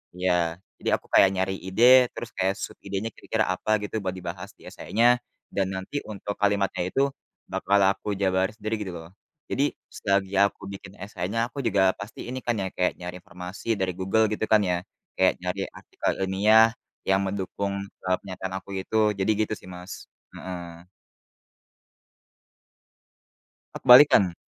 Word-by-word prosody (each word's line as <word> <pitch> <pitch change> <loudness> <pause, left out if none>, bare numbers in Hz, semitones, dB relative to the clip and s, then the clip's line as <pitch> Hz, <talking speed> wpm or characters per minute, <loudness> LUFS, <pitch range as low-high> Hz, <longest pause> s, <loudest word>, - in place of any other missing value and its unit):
Iya, 90 -2 0 0.2
jadi - - -2
aku - - -24
kayak 95 - +7
nyari 95 0 -1
ide, 120 +7 +6
terus 120 - -7
kayak 95 +1 +1
sub - - -5
idenya 100 +2 -3
kira-kira - - -1
apa 110 0 0
gitu 105 - -5
buat 95 - -1
dibahas 90 +2 -7
di - - -14
essay-nya, 115 +3 +1 0.5
dan 95 -1 0
nanti 95 +10 -4
untuk 100 -1 -6
kalimatnya 100 -3 +1
itu 135 - +1 0.5
bakal 100 +1 +2
aku 100 - -8
jabarin 95 0 +1
sendiri 110 +1 -3
gitu 95 - -6
loh. 80 0 -11 0.4
Jadi 140 - 0 0.2
selagi 100 -1 -1
aku 100 0 -1
bikin 100 0 -10
essay-nya 100 +4 -2
aku 135 +3 -6
juga 95 -4 +3
pasti 105 - -8
ini 130 +1 -4
kan 120 -3 0
ya, 95 - -1
kayak 90 0 0
nyari 90 0 -6
informasi 90 +4 -9
dari 95 -1 0
Google 95 +4 +2
gitu 105 - -2
kan 110 - +7
ya, 90 - +2 0.4
kayak - - +3
nyari - - -3
artikel - - -3 0.2
ilmiah 105 +4 +6 0.4
yang 95 0 +4
mendukung, 100 +1 -3 0.3
eee, 95 0 +2
pernyataan 95 -1 -6
aku - - -20
itu, 95 +3 -6 0.2
jadi 95 +2 +1 0.2
gitu - - -3
sih 95 - -13
Mas. 90 +1 -8 0.4
Heeh. 85 -2 -8 2.9
E - - -4
kebalikan. 125 - +8
95 Hz, 155 wpm, -26 LUFS, 95-105 Hz, 2.9 s, kebalikan